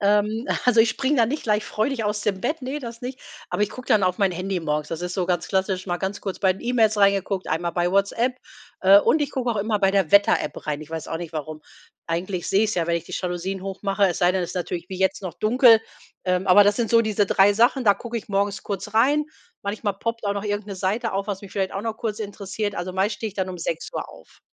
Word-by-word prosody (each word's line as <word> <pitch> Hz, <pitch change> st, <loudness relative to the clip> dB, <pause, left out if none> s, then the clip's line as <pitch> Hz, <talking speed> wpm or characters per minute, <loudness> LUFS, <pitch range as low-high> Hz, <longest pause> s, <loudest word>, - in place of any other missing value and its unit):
Ähm, 210 Hz, +4 st, +1 dB, 0.2 s
also, 245 Hz, -2 st, +3 dB
ich 225 Hz, -, +5 dB
springe 275 Hz, +2 st, 0 dB
da 230 Hz, -2 st, +4 dB
nicht 295 Hz, +6 st, -3 dB
gleich 210 Hz, -1 st, +1 dB
freudig 225 Hz, +2 st, -1 dB
aus 210 Hz, 0 st, -1 dB
dem 195 Hz, -2 st, -1 dB
Bett, 300 Hz, -2 st, -2 dB
ne, 270 Hz, +4 st, -3 dB
das 235 Hz, -3 st, -8 dB
nicht. 255 Hz, +1 st, -6 dB, 0.3 s
Aber 210 Hz, -, 0 dB
ich 210 Hz, -, 0 dB
gucke 255 Hz, +3 st, -10 dB
dann 210 Hz, -, +4 dB
auf 180 Hz, -1 st, +1 dB
mein 195 Hz, -3 st, +3 dB
Handy 185 Hz, +1 st, -3 dB
morgens. 150 Hz, -1 st, -2 dB
Das 165 Hz, 0 st, -4 dB
ist 180 Hz, 0 st, -3 dB
so 185 Hz, -3 st, -1 dB
ganz 175 Hz, -3 st, -1 dB
klassisch 190 Hz, -1 st, -1 dB
mal 175 Hz, -, 0 dB
ganz 195 Hz, +2 st, -4 dB
kurz 195 Hz, -2 st, -5 dB
bei 190 Hz, -2 st, +3 dB
den 190 Hz, -, -13 dB
E-Mails 225 Hz, -3 st, +2 dB
reingeguckt, 200 Hz, -1 st, +2 dB
einmal 170 Hz, +2 st, -1 dB
bei 175 Hz, 0 st, 0 dB
Whatsapp. 200 Hz, +6 st, +2 dB, 0.5 s
Äh, 195 Hz, +1 st, +8 dB
und 315 Hz, -, +2 dB
ich 290 Hz, -, -1 dB
gucke 250 Hz, -2 st, -1 dB
auch 220 Hz, -, -2 dB
immer 210 Hz, +1 st, 0 dB
bei 195 Hz, -, +4 dB
der 195 Hz, -5 st, +1 dB
Wetter 200 Hz, 0 st, +6 dB
App -, -, -6 dB
rein. 150 Hz, 0 st, -1 dB
Ich 155 Hz, -, -11 dB
weiß 165 Hz, -1 st, -5 dB
auch 165 Hz, -, -2 dB
nicht, 170 Hz, -1 st, -7 dB
warum. 155 Hz, 0 st, -5 dB, 0.5 s
Eigentlich 175 Hz, +2 st, -3 dB
sehe 195 Hz, +2 st, +3 dB
ich 215 Hz, -, 0 dB
es -, -, -2 dB
ja, 170 Hz, -2 st, 0 dB
wenn 170 Hz, -, +1 dB
ich 170 Hz, -, -5 dB
die -, -, -12 dB
Jalousien 180 Hz, +1 st, -3 dB
hoch 195 Hz, 0 st, -6 dB
mache, 200 Hz, 0 st, +2 dB
es 175 Hz, -, -1 dB
sei 175 Hz, 0 st, +4 dB
denn, 185 Hz, -1 st, 0 dB
es 175 Hz, -, -4 dB
ist -, -, -8 dB
natürlich 175 Hz, -1 st, -4 dB
wie 185 Hz, -, -6 dB
jetzt 190 Hz, +1 st, +1 dB
noch 185 Hz, -, -5 dB
dunkel. 230 Hz, 0 st, +5 dB, 0.4 s
Ähm, 180 Hz, 0 st, 0 dB
aber 195 Hz, +2 st, +8 dB
das 205 Hz, 0 st, +3 dB
sind 235 Hz, -2 st, -1 dB
so 230 Hz, -1 st, +6 dB
diese 215 Hz, -2 st, +1 dB
3 195 Hz, +1 st, +5 dB
Sachen, 245 Hz, +5 st, +3 dB
da 205 Hz, -2 st, +6 dB
gucke 235 Hz, +3 st, -6 dB
ich 215 Hz, -, -6 dB
morgens 200 Hz, 0 st, 0 dB
kurz 200 Hz, +1 st, -5 dB
rein. 285 Hz, +7 st, +4 dB, 0.4 s
Manchmal 205 Hz, 0 st, -2 dB
poppt 230 Hz, +1 st, -3 dB
auch 200 Hz, -, 0 dB
noch 200 Hz, +1 st, -4 dB
irgend 205 Hz, 0 st, -2 dB
'ne 200 Hz, -, -6 dB
Seite 205 Hz, +5 st, -1 dB
auf, 195 Hz, 0 st, -2 dB
was 200 Hz, -2 st, -3 dB
mich 195 Hz, -, -10 dB
vielleicht 190 Hz, -2 st, -1 dB
auch 195 Hz, -, -4 dB
noch 225 Hz, -1 st, -3 dB
kurz 225 Hz, -2 st, -3 dB
interessiert. 205 Hz, 0 st, -4 dB
Also, 180 Hz, +1 st, -4 dB
meist 195 Hz, +3 st, 0 dB
stehe 220 Hz, -, -4 dB
ich 200 Hz, -, -13 dB
dann 190 Hz, -2 st, -2 dB
um 180 Hz, -1 st, -6 dB
6:00 165 Hz, -1 st, -4 dB
auf. -, -, -17 dB
200 Hz, 270 wpm, -23 LUFS, 185-220 Hz, 0.5 s, Äh